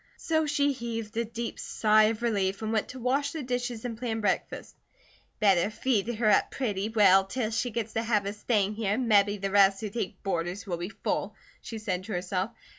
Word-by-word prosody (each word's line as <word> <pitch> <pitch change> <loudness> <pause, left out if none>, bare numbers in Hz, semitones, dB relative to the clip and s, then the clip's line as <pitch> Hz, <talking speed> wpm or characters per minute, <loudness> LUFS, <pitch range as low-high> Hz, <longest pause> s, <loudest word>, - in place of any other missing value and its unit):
So 315 -1 0
she 285 -1 +2
heaved 230 -4 -5
a 230 +1 0
deep 230 +1 -5
sigh 215 0 +3
of 225 +1 -1
relief 200 -3 0
and 220 +1 -2
went 220 - 0
to 260 - -9
wash 270 +5 0
the 315 -3 -4
dishes 245 -2 -3
and 235 -2 -3
plan 225 -1 -3
breakfast. 210 - -2 0.6
"Better 195 -3 +4
feed 220 -1 0
her 220 0 0
up - - +3
pretty 210 -5 -2
well 195 -4 +5
'til 225 +1 -2
she 230 +2 -1
gits 225 -1 -4
the 225 - 0
habit 210 -3 +1
of 205 - -6
staying 205 -2 +1
here 210 -2 -1
and 250 +1 -1
mebby 205 -1 +4
the 195 0 -3
rest 195 -1 +5
who 210 -2 -4
take 200 -4 -4
boarders 175 +1 -2
will 180 -4 -3
be 175 +2 -4
full," 210 0 -3 0.3
she 225 - -7
said 185 -4 -3
to 215 - -5
herself. 180 +2 -2
215 Hz, 210 wpm, -28 LUFS, 200-235 Hz, 0.6 s, well